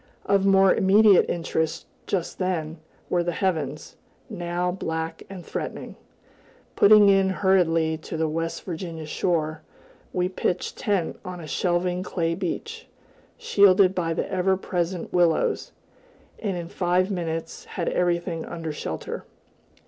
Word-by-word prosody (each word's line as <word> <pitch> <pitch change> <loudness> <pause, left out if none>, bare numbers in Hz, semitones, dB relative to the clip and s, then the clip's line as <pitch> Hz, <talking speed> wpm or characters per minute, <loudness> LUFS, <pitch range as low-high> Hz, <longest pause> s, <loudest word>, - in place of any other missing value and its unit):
Of 200 -1 +2
more 195 -1 +6
immediate 200 +1 +5
interest, 160 -2 -2 0.2
just 185 -4 -2
then, 165 -4 -2 0.3
were 175 - +1
the 175 0 -1
heavens, 155 -6 -2 0.3
now 175 -2 -2
black 160 -2 -4
and 185 -3 -9
threatening. - - -5 0.8
Putting 210 0 +7
in 195 -1 +4
hurriedly 165 -5 +2
to 160 - -6
the 160 0 +1
West 165 +2 -3
Virginia 165 -2 -6
shore, 155 -1 -1 0.5
we 180 0 0
pitched 185 -1 -2
tent 200 -7 -1
on 180 -1 -7
a 165 - -8
shelving 180 +3 0
clay 165 -3 -1
beach, 450 - -5 0.5
shielded 200 - +5
by 165 -3 -1
the - - -2
ever 190 0 +2
present 180 -1 -3
willows, 175 -3 +2 0.7
and 195 -5 -2
in 170 -1 -5
five 180 +2 +1
minutes 165 -3 -4
had 175 - -4
everything 175 -1 0
under 165 -2 -5
shelter. 150 - -5
175 Hz, 130 wpm, -25 LUFS, 165-190 Hz, 0.8 s, Putting